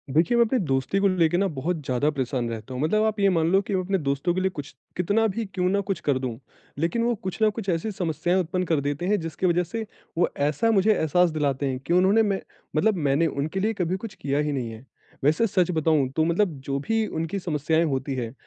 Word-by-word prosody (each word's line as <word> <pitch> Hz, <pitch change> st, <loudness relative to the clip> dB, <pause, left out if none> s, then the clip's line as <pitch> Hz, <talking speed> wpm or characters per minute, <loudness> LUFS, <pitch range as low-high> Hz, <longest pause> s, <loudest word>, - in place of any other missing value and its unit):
देखिए, 205 Hz, +10 st, +3 dB
मैं 235 Hz, -, +6 dB
अपनी 255 Hz, +4 st, 0 dB
दोस्ती 135 Hz, +7 st, 0 dB
को 200 Hz, -, +3 dB
लेके 175 Hz, -3 st, +2 dB
ना 195 Hz, +1 st, +2 dB
बहुत 160 Hz, +5 st, -2 dB
ज़्यादा 130 Hz, +3 st, +1 dB
परेशान 130 Hz, -4 st, -2 dB
रहता 115 Hz, +2 st, -6 dB
हूँ, 125 Hz, -, -3 dB
मतलब 215 Hz, +8 st, +2 dB
आप 215 Hz, -1 st, -1 dB
ये 200 Hz, -, +4 dB
मान 165 Hz, -3 st, +2 dB
लो 190 Hz, -, +5 dB
कि 200 Hz, -, -5 dB
मैं 185 Hz, -, +1 dB
अपने 195 Hz, +2 st, 0 dB
दोस्तों 140 Hz, +3 st, 0 dB
के 185 Hz, -, -1 dB
लिए 190 Hz, -, +2 dB
कुछ 145 Hz, -7 st, -8 dB, 0.2 s
कितना 205 Hz, +6 st, +2 dB
भी 220 Hz, +2 st, -3 dB
क्यों 180 Hz, -1 st, 0 dB
ना 200 Hz, +2 st, +2 dB
कुछ 195 Hz, -, 0 dB
कर 140 Hz, -3 st, +1 dB
दूँ। 125 Hz, -3 st, -4 dB, 0.4 s
लेकिन 170 Hz, +9 st, 0 dB
वो 240 Hz, +1 st, +2 dB
कुछ 190 Hz, +3 st, -5 dB
ना 215 Hz, -, +5 dB
कुछ 220 Hz, -4 st, -5 dB
ऐसी 175 Hz, +5 st, -1 dB
समस्याएँ 180 Hz, -1 st, 0 dB
उत्पन्न 180 Hz, +1 st, -1 dB
कर 160 Hz, -4 st, +1 dB
देते 145 Hz, +4 st, -2 dB
हैं, 205 Hz, +2 st, +2 dB
जिसकी 165 Hz, +2 st, -3 dB
वजह 175 Hz, 0 st, +2 dB
से 220 Hz, +6 st, -5 dB, 0.3 s
वो 175 Hz, -, +3 dB
ऐसा 150 Hz, +10 st, +1 dB
मुझे 210 Hz, 0 st, +4 dB
एहसास 175 Hz, +1 st, +2 dB
दिलाते 145 Hz, -3 st, -1 dB
हैं 130 Hz, -2 st, -2 dB
कि 170 Hz, -, +1 dB
उन्होंने 190 Hz, +5 st, +4 dB
मै 200 Hz, -2 st, 0 dB, 0.4 s
मतलब 210 Hz, +7 st, +3 dB
मैंने 145 Hz, +5 st, +3 dB
उनके 155 Hz, +5 st, -2 dB
लिए 215 Hz, +3 st, +1 dB
कभी 180 Hz, -3 st, -1 dB
कुछ 215 Hz, +1 st, -8 dB
किया 145 Hz, -6 st, -1 dB
ही 150 Hz, 0 st, 0 dB
नहीं 130 Hz, -5 st, -2 dB
है। 110 Hz, +3 st, -11 dB, 0.4 s
वैसे 155 Hz, +10 st, +3 dB
सच 185 Hz, -4 st, +1 dB
बताऊँ 160 Hz, -4 st, +2 dB
तो 160 Hz, -, +3 dB
मतलब 175 Hz, +3 st, +2 dB
जो 140 Hz, 0 st, -1 dB
भी 225 Hz, +10 st, 0 dB
उनकी 165 Hz, +5 st, -3 dB
समस्याएँ 160 Hz, -1 st, 0 dB
होती 135 Hz, -2 st, -2 dB
हैं, 120 Hz, -2 st, -4 dB
170 Hz, 245 wpm, -25 LUFS, 145-195 Hz, 0.4 s, मैं